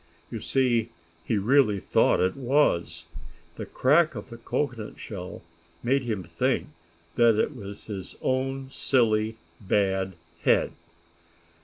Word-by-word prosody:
You - - -4
see 120 -4 +1 0.3
he 110 - 0
really 110 -1 +3
thought - - +3
it 90 +1 +1
was. 120 - +1 0.5
The - - -6
crack 155 +5 +3
of - - -8
the 115 - -8
cocoanut 115 -2 -3
shell 90 -5 -7 0.4
made 135 +3 +2
him 110 -7 -3
think 85 0 -1 0.5
that 115 -2 +6
it 135 +7 0
was 100 -3 -9
his 95 -4 -7
own 135 +1 -1
silly, 110 -5 +1 0.3
bad 95 -1 +1 0.3
head. - - +3
115 Hz, 125 wpm, -26 LUFS, 100-130 Hz, 0.5 s, that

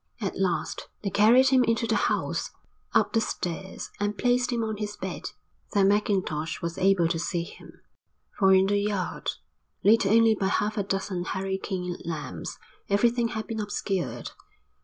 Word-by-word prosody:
At - - -3
last - - -1 0.2
they 200 - -1
carried 235 +7 +6
him 260 -1 +5
into 230 -1 +1
the - - +1
house, - - -1 0.4
up - - +2
the 225 - +3
stairs, 185 -2 -4
and 205 0 -1
placed 250 0 +2
him 235 -1 0
on 220 -1 -3
his 210 0 -4
bed. - - -5 0.4
Then 195 -2 +4
Mackintosh 190 -7 0
was 170 0 -4
able 190 -3 +4
to 165 0 -1
see 170 +1 -1
him, - - -13 0.5
for 190 -2 +4
in 190 0 +6
the 205 +1 +2
yard, 200 -2 -2 0.5
lit 210 -1 +5
only 225 +2 +5
by 200 -2 -1
half 210 +2 0
a 210 - 0
dozen 195 -2 -2
hurricane 190 -1 -3
lamps, 160 -3 -5 0.3
everything 235 +4 +3
had 220 -2 -4
been 225 -2 -4
obscured. 205 -3 -3
200 Hz, 160 wpm, -27 LUFS, 190-220 Hz, 0.5 s, carried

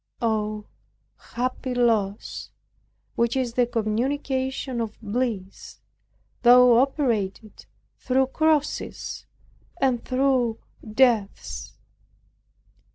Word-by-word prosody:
Oh, 215 -2 -1 0.7
happy 255 +1 -2
loss, 220 -4 0 0.6
which 235 +1 0
is 250 -3 -1
the 245 0 +2
consummation 260 +3 -1
of 220 -1 -5
bliss, 215 -3 -4 0.6
though 245 -1 +7
operated 225 -7 -2 0.3
through 265 +1 +2
crosses 310 -2 -1 0.5
and 255 -5 +1
through 255 -3 +1 0.4
deaths! 235 -6 +1
245 Hz, 75 wpm, -24 LUFS, 220-260 Hz, 0.7 s, though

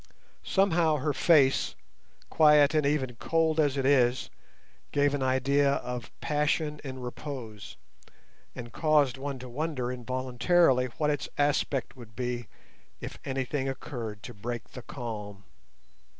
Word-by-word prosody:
Somehow 170 -5 +2
her 150 +1 -1
face, 140 -6 +3 0.6
quiet 150 -1 +6
and 155 -2 +2
even 130 -5 -1
cold 160 +2 +1
as 145 -3 +2
it 135 - 0
is, 130 -3 +3 0.6
gave 145 0 +2
an 145 - -1
idea 140 +2 +2
of 125 -3 -4
passion 150 0 0
in 130 -2 -6
repose, 125 -4 -7 0.8
and 120 -2 -8
caused 145 -4 +2
one 140 0 -4
to 125 0 -9
wonder 130 -1 -3
involuntarily 130 +3 +2
what 150 -1 +2
its 145 -4 -3
aspect 145 -3 0
would 115 -4 -13
be 120 0 -3 0.5
if - - -8
anything 135 +1 -2
occurred 115 -5 -6
to - - -8
break 115 +2 -6
the 125 - -8
calm. 105 -6 -7
135 Hz, 130 wpm, -28 LUFS, 125-150 Hz, 0.8 s, quiet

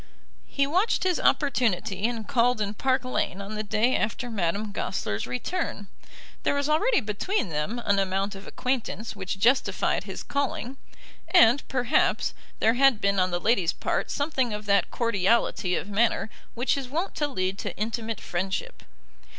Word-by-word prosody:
He 275 - +1
watched 365 +10 +1
his 370 -2 +1
opportunity, 225 - +1
and 230 -3 -4
called 245 -3 +2
in 205 -1 -1
Park 260 +2 0
Lane 225 -6 -1
on 200 +2 -6
the 215 - -2
day 215 +4 +1
after 235 +3 -2
Madame 205 +1 -1
Goesler's 110 - -3
return. 205 - -3 0.5
There - - +1
was 285 0 0
already 310 - +3
between 210 - -1
them 150 +9 -2
an 200 -1 +3
amount 195 +1 0
of 195 0 -10
acquaintance 250 -3 -3
which 195 -1 -4
justified 245 +7 +2
his - - -6
calling, 275 -2 -2 0.5
and, 285 -7 +6
perhaps, 255 +2 +1 0.3
there 225 - +4
had 265 -2 +4
been 200 -1 +1
on 185 0 +2
the 175 -1 -1
lady's 190 -5 +2
part - - -2
something 270 -6 0
of 210 0 -7
that 200 -1 +3
cordiality 210 -4 +1
of - - -3
manner 220 +1 +1 0.2
which 245 +3 +1
is 265 -2 -5
wont 335 +8 -2
to 295 - +1
lead 190 -7 -2
to - - -5
intimate 225 +1 -3
friendship. 185 +1 -3
225 Hz, 160 wpm, -26 LUFS, 200-265 Hz, 0.5 s, and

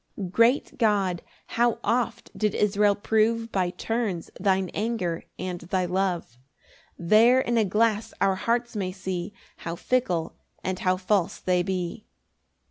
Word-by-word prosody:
1 190 -3 -5
Great 230 +8 +2
God, 200 -6 +2 0.2
how 235 -1 +1
oft 235 0 -1
did 210 -2 0
Israel 205 0 +3
prove 225 +2 +1
By 185 -2 +1
turns 195 -1 -3
thine 190 -2 +1
anger 205 -6 -2
and 180 -1 -4
thy 180 +2 -1
love! 180 -9 -2 0.6
There 220 +8 +5
in 240 -2 0
a 225 - +4
glass 215 +2 +1
our 195 -1 +3
hearts 235 +5 -1
may 190 -3 -2
see 185 0 -4 0.3
How 165 0 -5
fickle 180 -6 -1 0.3
and 185 0 -2
how 185 0 +1
false 190 0 0
they 180 -1 +1
be. 185 +3 -3
195 Hz, 140 wpm, -26 LUFS, 185-225 Hz, 0.6 s, There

